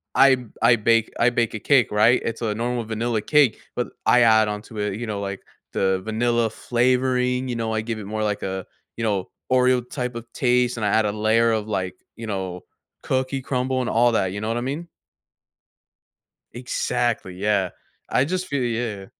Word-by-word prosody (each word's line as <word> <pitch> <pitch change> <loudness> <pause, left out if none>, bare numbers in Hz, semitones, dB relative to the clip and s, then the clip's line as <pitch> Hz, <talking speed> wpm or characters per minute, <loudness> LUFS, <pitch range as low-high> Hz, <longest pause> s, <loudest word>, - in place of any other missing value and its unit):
I 135 -1 +7
b 125 - -9 0.2
I 120 +1 +6
bake 115 +1 +2
I 120 - +5
bake 120 -1 0
a - - -4
cake, 130 0 +3
right? 110 +4 +4
It's 115 - -3
a 110 -3 0
normal 120 +1 -2
vanilla 115 0 -1
cake, 145 -4 +3 0.2
but - - -1 0.2
I 125 - +5
add 110 -2 +5
onto 105 +1 -6
it, 105 -1 -1
you 120 - -4
know, 100 -2 -3
like, 100 -1 -5 0.3
the 95 -1 +1
vanilla 115 +1 +1
flavoring, 125 +1 +1
you 120 - -2
know, 115 -1 -2
I 110 - 0
give 110 0 -4
it 105 - -7
more 110 +2 -3
like 105 -1 -2
a 95 -1 -3 0.3
you 115 - -3
know, 100 -4 0 0.3
Oreo 125 -1 +3
type 125 -3 -4
of 115 - -5
taste, 125 -1 +2
and 105 - -1
I - - +2
add 110 +2 +3
a 105 - +1
layer 110 +2 +2
of, 110 -1 -1
like, 95 -3 -2 0.2
you 115 -1 -7
know, 95 -3 -4 0.4
cookie 130 +1 -1
crumble 130 0 -1
and 120 - -2
all 120 +1 +3
that, 95 -4 +2
you 100 - -4
know 110 - -3
what 115 - -1
I - - -2
mean? 145 +7 -4 1.7
Exactly, 120 -5 -2
yeah. 100 -1 +1 0.4
I 130 - +2
just 185 +3 -2
feel 140 -3 -1
yeah. 115 -4 -2
115 Hz, 200 wpm, -23 LUFS, 105-125 Hz, 1.7 s, I